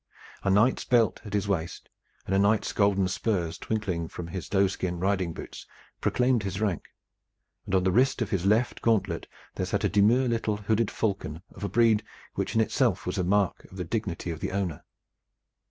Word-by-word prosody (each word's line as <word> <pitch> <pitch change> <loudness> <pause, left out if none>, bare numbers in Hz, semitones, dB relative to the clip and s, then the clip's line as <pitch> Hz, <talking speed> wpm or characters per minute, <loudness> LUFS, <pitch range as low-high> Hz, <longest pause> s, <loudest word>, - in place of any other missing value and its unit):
A - - 0
knight's 105 +7 +3
belt 120 -3 +2
at 105 - -8
his 100 -1 0
waist 85 -4 -2 0.4
and 95 - -2
a 95 - +4
knight's 100 +2 +2
golden 100 -2 +3
spurs 90 -3 -1
twinkling 95 -7 -2
from 85 +1 -7
his 90 +1 -6
doeskin 95 -3 0
riding 95 -2 0
boots - - -9 0.3
proclaimed 125 -2 +2
his 95 -1 -4
rank, 100 -6 -1 0.8
and 95 - 0
on 95 - +3
the 95 - +2
wrist 130 +8 +3
of 115 -3 -2
his 95 -4 0
left 110 +5 +2
gauntlet 100 -7 +1 0.3
there - - -2
sat - - -1
a - - +3
demure 110 +6 +4
little 115 -3 0
hooded 110 +1 +1
falcon 95 -6 -3
of - - -10
a 100 - -1
breed 115 -2 +4 0.3
which - - -3
in 110 - +5
itself 110 - +1
was - - -2
a - - +1
mark 100 +1 +1
of 95 - -13
the 90 - -3
dignity 90 -2 -3
of 80 - -6
the - - -3
owner. 95 -5 -2
100 Hz, 190 wpm, -27 LUFS, 90-110 Hz, 0.8 s, in